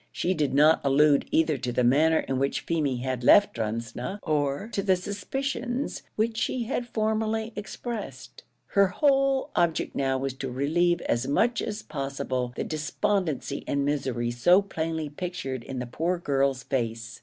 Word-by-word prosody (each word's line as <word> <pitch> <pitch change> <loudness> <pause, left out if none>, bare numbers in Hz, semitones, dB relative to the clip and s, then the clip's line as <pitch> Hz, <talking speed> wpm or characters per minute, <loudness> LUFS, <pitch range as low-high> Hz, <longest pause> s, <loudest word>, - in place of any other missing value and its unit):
She 185 - 0
did 150 -6 0
not 155 +3 +5
allude 140 +1 +4
either 160 -3 +2
to 125 0 -2
the 125 +1 +1
manner 155 +6 +4
in 135 -1 -2
which 140 +1 0
Feemy 145 -7 -1
had 130 -2 -2
left 205 +10 +6
Drumsna, 115 - -3
or 145 +3 0
to 200 - -2
the 190 -1 +3
suspicions 240 +7 -3
which 220 +1 0
she 250 +1 -1
had 240 +1 -3
formerly 220 0 -1
expressed. 205 - -7 0.3
Her 200 -1 +4
whole 275 +5 +2
object 170 -2 +1
now 135 -1 +1
was 135 0 -2
to 135 - -3
relieve 160 +7 +1
as 120 +2 -1
much 235 - +2
as 210 -1 -4
possible 135 -3 -3
the - - -2
despondency 155 -1 -1
and 140 0 0
misery 130 -5 -1
so 175 +12 +4
plainly 160 -4 -3
pictured 145 -5 -5
in 135 +1 -6
the 125 - -3
poor 165 +9 -1
girl's 140 -4 0
face. 115 -4 -3
155 Hz, 160 wpm, -27 LUFS, 135-200 Hz, 0.3 s, left